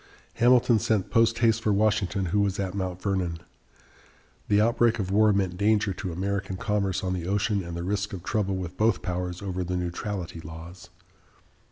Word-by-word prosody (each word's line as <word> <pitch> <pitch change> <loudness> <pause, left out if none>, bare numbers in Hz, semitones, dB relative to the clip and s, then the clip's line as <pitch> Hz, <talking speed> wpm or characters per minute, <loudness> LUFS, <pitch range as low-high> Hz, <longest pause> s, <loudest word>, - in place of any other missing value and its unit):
Hamilton 120 -1 +4
sent 110 -3 0
post 115 0 +3
haste 115 0 +3
for 110 - +1
Washington, 100 -1 +1
who 105 - +3
was 100 -1 0
at 95 -2 -2
Mount 95 -2 -3
Vernon. 95 -4 -1 1.1
The 105 0 +3
outbreak 115 +1 +3
of 95 -3 -3
war 105 +1 +5
meant 95 -3 0
danger 105 0 +2
to 90 0 -5
American 95 +2 -3
commerce 100 -2 -1
on 95 -1 -1
the 90 -2 -4
ocean 100 0 0
and 85 0 -6
the 85 - -4
risk 100 +2 -2
of 90 -3 -7
trouble 100 -3 -1
with 90 -1 -5
both 110 -2 +2
powers 90 +1 -3
over 95 -2 -2
the 90 +1 -2
neutrality 90 0 -4
laws. 80 +3 -10
100 Hz, 180 wpm, -26 LUFS, 90-105 Hz, 1.1 s, war